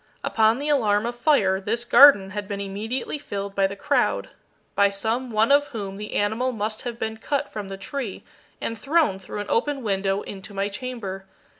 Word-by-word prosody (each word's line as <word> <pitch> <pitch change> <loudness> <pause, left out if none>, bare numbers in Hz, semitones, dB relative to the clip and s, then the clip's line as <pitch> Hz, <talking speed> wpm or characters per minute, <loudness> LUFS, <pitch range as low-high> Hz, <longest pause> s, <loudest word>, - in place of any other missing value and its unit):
Upon 220 +1 +3
the 285 +2 -3
alarm 220 -7 +2
of 240 0 -3
fire 215 -8 +2
this 230 +4 -2
garden 240 -8 +7
had 205 0 -5
been 200 -1 -4
immediately 215 +9 -3
filled 200 -7 -5
by 195 -1 +2
the 195 - -7
crowd, - - 0 0.4
by 200 0 +4
some 225 +6 -2
one 220 +2 +2
of 290 0 +5
whom 200 -5 -6
the 210 +1 -6
animal 220 +5 +1
must 215 -1 -3
have 240 -2 -5
been 220 -1 -3
cut 280 +5 -2
from 210 -2 -5
the 195 0 -6
tree 220 +2 -5 0.4
and 230 - -3
thrown 275 - +1
through 200 +2 -6
an 205 - -7
open 275 +2 0
window 195 -1 0
into 195 +1 -9
my 195 +1 -1
chamber. 205 -4 -6
215 Hz, 190 wpm, -24 LUFS, 200-245 Hz, 0.4 s, garden